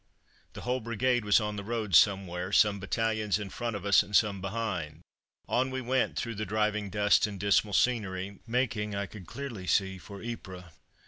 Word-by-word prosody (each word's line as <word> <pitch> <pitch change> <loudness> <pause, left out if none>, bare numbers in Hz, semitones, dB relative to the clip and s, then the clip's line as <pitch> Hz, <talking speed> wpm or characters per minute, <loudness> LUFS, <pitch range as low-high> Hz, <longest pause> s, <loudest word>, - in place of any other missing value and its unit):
The - - -8
whole 125 +2 -1
brigade 120 +1 0
was 105 +2 +5
on 105 -1 -3
the 100 - -4
road 110 -2 -3
somewhere, 95 0 +3
some 100 0 +4
battalions 110 +1 0
in 105 -2 -6
front 120 -2 -3
of 100 -1 -6
us 100 -1 +6
and 105 - -5
some 100 -3 +3
behind. 95 -7 -3 0.5
On 130 +2 +1
we 130 0 -3
went 130 +1 0
through 115 -1 -2
the 110 0 -4
driving 105 0 0
dust 105 +1 +3
and 100 -2 -7
dismal 100 +1 +2
scenery, 100 -5 0
making, 115 -4 -1
I 100 0 -2
could 95 -3 -11
clearly 120 -10 -6
see, 95 0 +1
for 100 +4 -10
Ypres. 95 -6 -7
105 Hz, 185 wpm, -29 LUFS, 100-115 Hz, 0.5 s, us